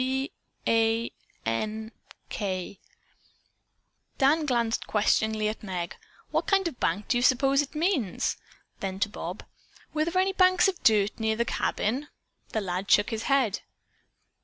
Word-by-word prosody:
"B 265 +2 -1 0.3
a 225 +1 +2 0.3
n 215 - -2 0.4
k." 190 -2 -3 1.4
Dan 300 +3 +3
glanced 235 -3 0
questioningly 215 0 +2
at 215 - -3
Meg. 180 -4 -4 0.4
"What - - 0
kind 390 -2 +3
of 335 - -3
a - - -29
bank 195 +4 -1
do 240 - +2
you - - -1
suppose 270 +2 +4
it 290 +1 -7
means?" 305 - 0 0.4
Then 190 -1 -4
to 205 - +2
Bob: 180 -1 -6 0.5
"Were 310 - +2
there 340 +2 0
any 385 +1 +2
banks 370 -1 +5
of 380 -2 -2
dirt 210 -1 +3
near 220 0 +1
the 235 +1 0
cabin?" 255 +5 -1 0.4
That 220 - -2
lad 185 +1 -3
shook 205 - +5
his 225 -1 -3
head. 260 -7 +2
225 Hz, 150 wpm, -27 LUFS, 205-275 Hz, 1.4 s, banks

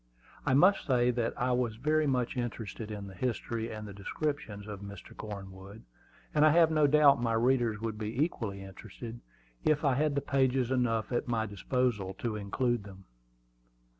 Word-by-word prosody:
I 130 - +4
must 185 +7 +5
say 125 -2 +3
that 120 -1 -2
I 125 +1 +1
was 125 -3 0
very 155 +5 +1
much 125 -2 0
interested 115 -3 -4
in 105 -2 -5
the 95 - -9
history 115 +1 -2
and 110 -1 -6
descriptions 105 0 -4
of 105 -2 -7
Mr. 100 0 -10
Cornwood; 100 0 -9 0.5
and 150 - +4
I 155 - +8
have 165 +1 +5
no 155 -2 +4
doubt 145 -3 +6
my 115 -1 +1
readers 120 -2 +2
would 110 -2 -3
be 110 +3 -4
equally 110 - -1
interested, 110 +4 -9 0.4
if 155 0 +2
I 140 - +4
had 140 +1 0
pages 130 -2 +2
enough 120 -3 +1
at 120 - -1
my 115 -2 0
disposal 105 -1 -1
to 110 +2 -3
include 115 +3 -1
them. 95 -1 -12
120 Hz, 165 wpm, -31 LUFS, 105-130 Hz, 0.5 s, I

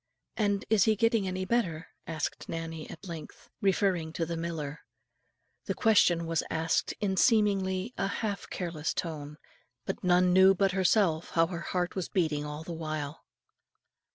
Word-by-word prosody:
"And 205 -2 0
is 215 -4 +4
he 220 -1 +4
getting 225 -2 +2
any 185 0 -2
better?" 180 -8 -1 0.2
asked 160 -2 -4
Nannie 165 -1 -5
at 165 - -10
length, 165 -3 -9
referring 185 -5 +1
to 165 - -1
the 170 +1 -3
miller. 165 -3 -4 0.9
The - - -2
question 180 -7 +4
was 165 0 0
asked 160 0 0
in 195 -2 0
seemingly 200 -2 +2
a - - +1
half 200 0 -3
careless 165 -4 -3
tone, 150 -3 -4 0.5
but - - -4
none 180 0 +4
knew 190 +1 +7
but 195 +1 +2
herself, 185 -3 +2
how 165 0 +4
her 170 0 -5
heart 180 +2 -2
was 185 -3 -3
beating 155 -5 0
all 150 +1 -6
the 170 - -6
while. 155 -2 -4
175 Hz, 155 wpm, -29 LUFS, 160-195 Hz, 0.9 s, knew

